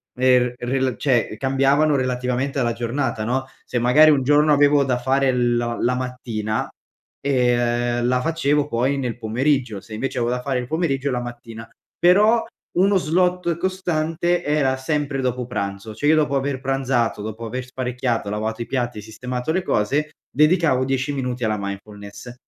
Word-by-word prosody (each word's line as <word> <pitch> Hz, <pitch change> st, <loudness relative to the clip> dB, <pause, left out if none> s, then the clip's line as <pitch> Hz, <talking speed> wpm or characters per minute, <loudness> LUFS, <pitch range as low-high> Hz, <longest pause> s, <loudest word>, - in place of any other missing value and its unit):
er 125 Hz, -1 st, +3 dB
rela 130 Hz, 0 st, -1 dB
cioè, 120 Hz, -6 st, 0 dB
cambiavano 135 Hz, +4 st, +2 dB
relativamente 130 Hz, +2 st, -1 dB
alla 120 Hz, -2 st, +1 dB
giornata, 120 Hz, -1 st, -2 dB
no, 130 Hz, +3 st, -1 dB, 0.2 s
se 120 Hz, -, -2 dB
magari 150 Hz, +6 st, +6 dB
un 135 Hz, -3 st, +2 dB
giorno 150 Hz, +2 st, +4 dB
avevo 145 Hz, 0 st, +4 dB
da 125 Hz, -2 st, +1 dB
fare 135 Hz, +1 st, +2 dB
lo 120 Hz, -1 st, 0 dB
la 125 Hz, +1 st, +1 dB
mattina, 120 Hz, -4 st, -3 dB, 0.5 s
ehm, 120 Hz, -2 st, +1 dB
la 125 Hz, 0 st, +1 dB
facevo 150 Hz, -2 st, +1 dB
poi 130 Hz, +2 st, 0 dB
nel 125 Hz, -4 st, -3 dB
pomeriggio, 120 Hz, -1 st, 0 dB
se 110 Hz, -, -12 dB
invece 130 Hz, +4 st, -3 dB
avevo 120 Hz, 0 st, 0 dB
da 125 Hz, -, -3 dB
fare 130 Hz, -1 st, -1 dB
il 125 Hz, -, -5 dB
pomeriggio, 140 Hz, -3 st, -1 dB
la 125 Hz, -, -1 dB
mattina. 120 Hz, -2 st, -9 dB, 0.3 s
Però 210 Hz, +6 st, +4 dB, 0.3 s
uno 195 Hz, +2 st, +4 dB
slot 180 Hz, 0 st, +1 dB
costante 175 Hz, -1 st, -1 dB
era 145 Hz, -3 st, +1 dB
sempre 145 Hz, 0 st, -2 dB
dopo 125 Hz, -1 st, -2 dB
pranzo. 100 Hz, +1 st, -4 dB
Cioè, 145 Hz, +6 st, +1 dB
io 160 Hz, -, +6 dB
dopo 150 Hz, -3 st, +1 dB
aver 135 Hz, -1 st, -1 dB
pranzato, 130 Hz, -5 st, 0 dB
dopo 110 Hz, +2 st, -6 dB
aver 125 Hz, +3 st, -4 dB
sparecchiato, 125 Hz, -3 st, -2 dB
lavato 110 Hz, +2 st, -3 dB
i -, -, -2 dB
piatti, 120 Hz, -4 st, -2 dB
e -, -, -7 dB
sistemato 125 Hz, +5 st, -4 dB
le 185 Hz, +3 st, 0 dB
cose, 145 Hz, +8 st, 0 dB, 0.2 s
dedicavo 150 Hz, -3 st, +3 dB
10 135 Hz, +2 st, -1 dB
minuti 125 Hz, -2 st, -3 dB
alla 110 Hz, -1 st, 0 dB
mindfulness. 100 Hz, +3 st, -8 dB
130 Hz, 165 wpm, -22 LUFS, 120-145 Hz, 0.5 s, magari